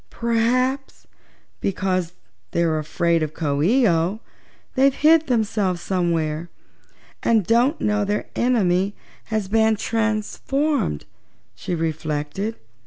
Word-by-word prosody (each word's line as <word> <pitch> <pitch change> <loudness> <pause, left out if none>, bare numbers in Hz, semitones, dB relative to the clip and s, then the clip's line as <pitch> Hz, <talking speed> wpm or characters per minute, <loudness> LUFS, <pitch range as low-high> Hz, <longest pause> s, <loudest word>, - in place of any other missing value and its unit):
"P'raps, 250 +4 0 0.5
because 185 -3 -1 0.4
they 170 - +2
were 160 -1 +1
afraid 165 +2 0
of 155 0 -3
Coo 145 -3 -1
ee 235 - +4
oh, 170 +4 +1 0.5
they've 270 0 +3
hid 320 +1 +4
themselves 210 -7 0
somewhere, 170 -3 -1 0.7
and 220 -5 +2
don't 240 - +2
know 210 0 +1
their 205 +1 -1
enemy 200 -5 +1 0.3
has 215 -3 -2
been 220 +2 +3
transformed," 225 - -1 0.5
she 180 - -4
reflected. 160 +5 -3
205 Hz, 105 wpm, -22 LUFS, 170-230 Hz, 0.7 s, ee